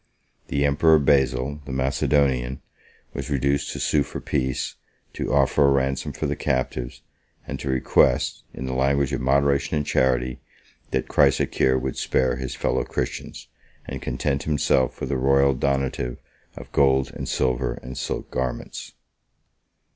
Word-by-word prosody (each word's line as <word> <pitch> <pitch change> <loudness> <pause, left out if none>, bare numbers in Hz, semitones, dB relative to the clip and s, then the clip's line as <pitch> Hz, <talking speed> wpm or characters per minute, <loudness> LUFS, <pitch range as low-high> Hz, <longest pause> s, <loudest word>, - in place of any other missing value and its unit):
The 70 +1 0
emperor 80 +3 +5
Basil, 70 -1 +2
the 70 - -7
Macedonian, 65 -1 +1 0.5
was 70 +2 -5
reduced 70 0 0
to - - -6
sue 75 - +2
for - - -4
peace, 65 0 -2 0.4
to - - -3
offer 70 +1 +4
a - - +4
ransom 70 -1 0
for - - -4
the 70 0 -1
captives, 65 -2 -2 0.4
and - - -5
to 70 - -4
request, 65 -1 +2
in 65 - -6
the 65 - -3
language 70 +1 +1
of 65 - -1
moderation 70 +3 +2
and 75 - -1
charity, 65 -2 +1 0.5
that 65 - -1
Chrysocheir 65 0 +3
would 65 0 -3
spare 65 -1 +1
his 65 0 -5
fellow - - 0
Christians, - - -5 0.4
and 65 -1 -6
content 70 +2 -1
himself 70 -4 +1
with - - -3
a 70 - +1
royal 70 +1 +4
donative 65 -2 -1 0.4
of - - -10
gold 65 -1 +3
and - - -5
silver 65 -1 0
and 65 +1 -7
silk - - -4
garments. 65 -1 -4
65 Hz, 145 wpm, -24 LUFS, 65-70 Hz, 0.5 s, emperor